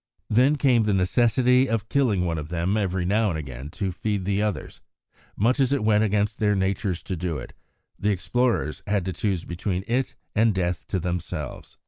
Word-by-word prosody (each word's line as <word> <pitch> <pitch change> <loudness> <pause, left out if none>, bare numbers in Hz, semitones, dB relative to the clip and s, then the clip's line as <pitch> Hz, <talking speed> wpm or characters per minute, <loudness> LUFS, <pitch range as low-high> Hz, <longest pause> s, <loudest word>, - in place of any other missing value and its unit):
Then 130 +7 +4
came 130 -5 +3
the 105 -2 +1
necessity 120 +7 +3
of 110 -1 -1
killing 110 -10 +2
one 85 -2 -1
of 75 0 -7
them 90 +3 0
every 95 -4 0
now 105 +3 +2
and 80 - -2
again 70 -2 -7
to 95 -2 -1
feed 100 +1 -2
the 100 +1 +1
others; 105 -2 -3 0.6
much 120 +7 +2
as 135 -1 +3
it 140 -5 +1
went 105 0 +4
against 105 0 0
their 105 -2 +2
natures 95 -1 -1
to 95 - -3
do 85 -2 -2
it, - - -8 0.5
the 105 - +1
explorers 100 - 0
had 100 -3 0
to 95 - -2
choose 95 -4 -1
between 90 +2 -3
it 125 +2 -1 0.2
and 110 -1 +3
death 90 -2 -2
to 95 - -1
themselves. 85 -4 -5
100 Hz, 190 wpm, -25 LUFS, 90-110 Hz, 0.6 s, Then